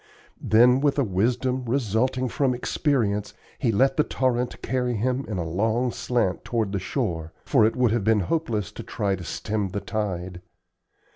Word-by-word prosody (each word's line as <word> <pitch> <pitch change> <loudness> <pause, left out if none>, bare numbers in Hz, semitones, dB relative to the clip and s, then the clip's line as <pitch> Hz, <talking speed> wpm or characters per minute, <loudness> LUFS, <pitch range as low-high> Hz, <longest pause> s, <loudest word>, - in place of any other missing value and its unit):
Then, 125 +4 +5
with 145 -1 +2
a 140 - +3
wisdom 125 +6 0
resulting 125 +1 0
from 130 +1 0
experience, 115 -6 0 0.2
he 120 - +2
let 135 +6 +2
the 150 - +5
torrent 125 -3 -1
carry 125 -1 0
him 125 +5 -1
in 105 - -3
a 85 -2 -2
long 110 +8 0
slant 115 -9 -1
toward 110 -4 -1
the 100 - -1
shore, 90 - -3
for 115 -7 +4
it 115 - -2
would 125 -3 +2
have 115 -2 0
been 110 0 +3
hopeless 110 - -1
to 110 - -8
try 105 -3 -1
to 90 - -8
stem 105 +6 -2
the 100 +2 -3
tide. 95 -4 -4
115 Hz, 170 wpm, -25 LUFS, 100-125 Hz, 0.2 s, Then